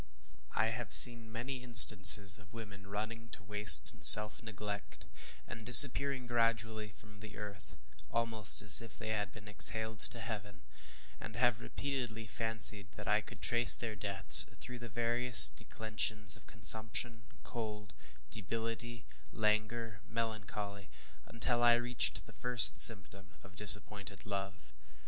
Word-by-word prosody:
I 110 +1 -5
have 115 -2 -12
seen 115 -2 +1
many 125 +3 -12
instances 100 -5 +5
of 105 +1 -23
women 100 -3 -16
running 110 +3 -12
to 110 - -15
waste 105 -5 +1
and - - -18
self 105 0 +4
neglect, 105 -2 -14 0.4
and 115 -2 -15
disappearing 130 +2 +8
gradually 115 -2 -7
from 105 0 -22
the 110 +1 -15
earth, 105 -2 -15 0.3
almost 115 -1 -5
as 105 -1 -2
if 115 -2 -17
they 110 -2 -12
had 105 -3 -8
been 105 -1 -20
exhaled 110 +1 -1
to 120 - -7
heaven; 105 -4 -13 0.6
and 110 0 -15
have 120 -1 -5
repeatedly 125 -6 -10
fancied 110 -3 -2
that 105 - -16
I 105 +1 -4
could - - -19
trace 120 -1 +3
their 115 -2 -10
deaths 100 -1 +4
through 125 0 -13
the 120 0 -15
various 120 +2 +4
declensions 105 -3 -7
of - - -16
consumption, 115 +1 -8 0.2
cold, 105 -5 -13 0.4
debility, 115 +2 -12 0.3
languor, 110 +1 -8
melancholy, 105 -3 -11 0.4
until 120 +1 -7
I 120 0 0
reached 120 0 -5
the - - -21
first 120 -1 -2
symptom 100 -3 -2
of 95 - -22
disappointed 100 -1 -2
love. 95 - -12
110 Hz, 135 wpm, -28 LUFS, 105-115 Hz, 0.6 s, disappearing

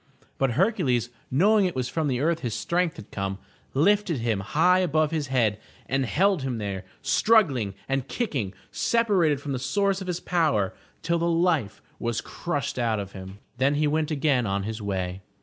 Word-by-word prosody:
But 135 -3 +2
Hercules, 145 - +1 0.2
knowing 200 +9 +4
it 180 - -2
was 130 -1 -1
from 155 +4 -1
the 130 -2 0
earth 165 +2 +1
his 120 -7 -3
strength 175 -1 0
had 105 - -11
come, 95 -1 -3 0.4
lifted 195 +2 +3
him 115 -3 0
high 165 - +3
above 155 -3 +1
his 155 -3 -1
head 115 -6 +1 0.3
and 135 0 0
held 190 - +2
him 130 -3 -2
there, 100 -3 -4 0.2
struggling 140 - +3
and 135 -1 -1
kicking, 135 - -2 0.2
separated 195 -11 +2
from 145 0 -5
the 130 - -2
source 195 +9 0
of 190 - -6
his 180 -1 -2
power, 155 - +1 0.3
till 170 0 +1
the 170 +1 +1
life 165 - +1 0.2
was 120 -1 -1
crushed 145 -7 -3
out 115 -3 +1
of 100 -1 -6
him. 95 0 -9 0.2
Then 140 +2 +3
he 150 +1 +2
went 155 +1 +1
again 140 -6 +1
on 100 0 -1
his 110 +2 -4
way. 95 -2 -3
140 Hz, 185 wpm, -26 LUFS, 115-170 Hz, 0.4 s, knowing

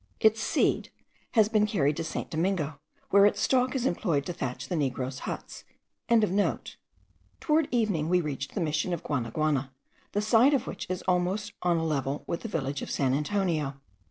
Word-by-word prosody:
Its 220 0 +4
seed - - +1 0.4
has 220 -3 +5
been 215 -1 +2
carried 155 -9 +1
to 165 - -3
St. - - -4
Domingo, 160 -3 -1 0.3
where 200 +1 +7
its - - 0
stalk 255 0 +2
is 255 -2 0
employed 165 - 0
to 175 - -3
thatch 130 -6 -4
the 180 - -2
negroes' 130 -3 -2
huts.) - - -7 1.8
Towards 310 -1 +2
evening 205 -10 0
we 180 0 +4
reached 140 -4 -4
the 200 - -1
Mission 155 +2 0
of 170 - -4
Guanaguana, 140 +2 -1 0.4
the 205 - +1
site 235 +6 +5
of 260 -2 -1
which - - -6
is 185 0 -3
almost 185 +4 0
on 175 -1 +2
a 165 - -1
level 140 -2 -1
with 170 - -3
the - - -5
village 145 -6 -2
of - - -5
San 130 -2 +1
Antonio. 150 -3 -1
170 Hz, 175 wpm, -28 LUFS, 145-210 Hz, 1.8 s, where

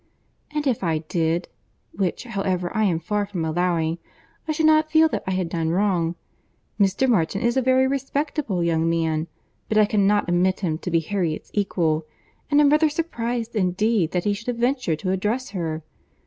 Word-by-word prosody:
"And 300 0 -3
if 250 -7 0
I 165 -3 +1
did, 165 +2 -1 0.4
(which, 185 -2 -2
however, 195 -5 -2
I 220 0 +2
am 170 -5 +1
far 205 +4 -1
from 180 -5 -3
allowing) 165 0 0 0.5
I - - 0
should 310 +1 +1
not 310 0 +4
feel 320 0 +5
that - - -3
I - - 0
had 185 -2 -1
done 165 -1 -2
wrong. 175 -2 +1 0.6
Mr. 200 +6 +2
Martin 195 -5 +1
is 235 +1 +2
a 265 - +3
very 260 +1 +3
respectable 275 - -1
young 165 -1 +1
man, 160 -1 0 0.4
but 215 - +1
I 215 - +6
cannot 205 -1 +2
admit 180 +2 +1
him 160 -4 -1
to 180 - -4
be 165 -1 +2
Harriet's 170 -2 -3
equal; 165 -6 0 0.4
and 290 0 +4
am 290 -1 +5
rather 305 +1 +4
surprized 240 -7 -3
indeed 195 -1 +1
that 180 -1 0
he 205 - +1
should 225 +4 -8
have 245 -1 -1
ventured 245 - 0
to 185 - -1
address 210 +6 -1
her. 160 -5 -3
195 Hz, 185 wpm, -23 LUFS, 170-240 Hz, 0.6 s, I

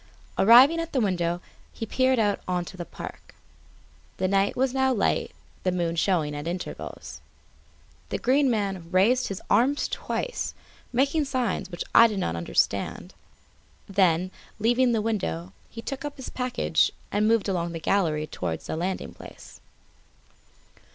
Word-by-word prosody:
Arriving 255 +10 +7
at 330 0 -4
the 265 - +2
window, 175 -5 0 0.3
he 225 - -5
peered 260 +3 +2
out 205 -3 +2
on 180 -1 -1
to 185 - -10
the 175 -1 -6
park. - - -10 0.8
The 185 - 0
night 195 +1 +2
was 260 0 +1
now 265 0 +2
light, 225 -6 +1 0.3
the 185 - +1
moon 170 -2 -1
showing 165 -4 +1
at 145 +2 -5
intervals. 175 +1 -6 0.9
The - - -1
Green 270 +2 +3
Man 195 -7 -2
raised 230 +8 +3
his 195 - -6
arms 275 +5 +3
twice, - - -3 0.4
making 280 +5 +2
signs 255 -9 -1
which 175 -2 -5
I 230 - +9
did 215 -3 -4
not 85 - -1
understand; 85 -8 -1 0.7
then, 185 -2 +2 0.3
leaving 240 +3 +3
the 225 -2 +1
window, 95 - -2 0.2
he 230 - -8
again - - -26
took 275 0 -4
up 290 0 -5
his 265 - -7
package 250 -9 +1 0.2
and 210 +1 +2
moved 225 -2 +2
along 175 -3 -1
the 165 - -4
gallery 160 -4 +1
towards 85 - -4
the - - -3
landing 180 +4 -3
place. - - -13
200 Hz, 155 wpm, -26 LUFS, 175-250 Hz, 0.9 s, I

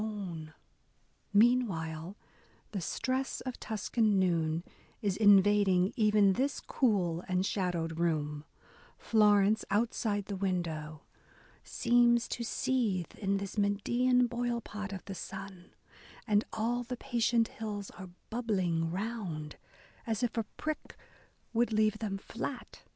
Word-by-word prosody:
BROWNING 185 -8 -5 0.8
Meanwhile 200 -7 +2 0.6
the 195 - -3
stress 260 +9 -2
of 255 -2 -6
Tuscan 220 -1 +1
noon 165 -3 +1 0.2
" - - -31
is 200 -3 +1
invading 200 -1 +5
even 210 -4 +4
this 270 +6 0
cool 185 - 0
and 185 +1 +1
shadowed 170 -5 -1
room: 150 -3 0 0.5
Florence, 210 -1 +4
outside 205 -1 0
the 200 - -4
window, 165 -5 -3 0.6
Seems 240 0 +3
to 235 - -3
seethe 225 -7 -1
In 200 -1 +1
this 200 +1 -4
Medean 240 +5 +2
boilpot 235 -4 -3
of 190 -2 -7
the 195 - -6
sun, 190 -1 -8 0.5
And 210 -1 +2
all 235 +2 -1
the 245 +1 -5
patient 235 -2 +1
hills 210 -3 -5
are 190 -2 -10 0.2
bubbling 185 -8 0
round, 180 -6 -4 0.5
As 225 +1 -1
if 240 - 0
a 225 -2 0
prick 310 0 -4 0.6
would 235 0 +2
leave 215 0 +2
them 205 -3 -2
flat." 240 +5 -6
205 Hz, 120 wpm, -31 LUFS, 185-230 Hz, 0.8 s, invading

